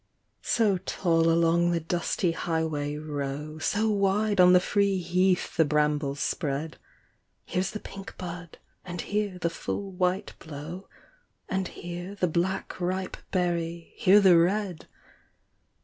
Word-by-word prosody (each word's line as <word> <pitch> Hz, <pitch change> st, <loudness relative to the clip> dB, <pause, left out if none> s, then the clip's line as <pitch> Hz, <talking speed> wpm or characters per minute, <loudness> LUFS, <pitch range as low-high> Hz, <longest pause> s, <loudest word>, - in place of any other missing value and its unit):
So 210 Hz, -5 st, +2 dB
tall 165 Hz, -3 st, +1 dB
along 170 Hz, +1 st, +3 dB
the 170 Hz, -1 st, +1 dB
dusty 170 Hz, +2 st, 0 dB
highway 160 Hz, -3 st, -2 dB
row. 150 Hz, 0 st, -4 dB
So 210 Hz, +7 st, +1 dB
wide 200 Hz, 0 st, +2 dB
on 180 Hz, 0 st, +8 dB
the 180 Hz, -, +8 dB
free 200 Hz, +1 st, +1 dB
heath 180 Hz, +1 st, +1 dB
the 165 Hz, -, +5 dB
brambles 150 Hz, -2 st, +1 dB
spread; 150 Hz, 0 st, -2 dB, 0.7 s
Here's 185 Hz, +1 st, -1 dB
the 215 Hz, -, -5 dB
pink 195 Hz, -1 st, -10 dB
bud, 175 Hz, -2 st, -7 dB, 0.3 s
and 175 Hz, -2 st, -5 dB
here 205 Hz, -2 st, -2 dB
the 170 Hz, -2 st, -1 dB
full 195 Hz, +3 st, -4 dB
white 185 Hz, +2 st, -1 dB
blow. 160 Hz, +5 st, -8 dB, 0.6 s
And 190 Hz, -1 st, -1 dB
here 175 Hz, +3 st, -7 dB
the 185 Hz, -2 st, +1 dB
black 180 Hz, +3 st, -2 dB
ripe 185 Hz, +1 st, -2 dB
berry, 170 Hz, -2 st, -2 dB
here 205 Hz, -2 st, +6 dB
the 185 Hz, -4 st, +6 dB
red. 185 Hz, 0 st, 0 dB
175 Hz, 135 wpm, -27 LUFS, 165-190 Hz, 0.7 s, on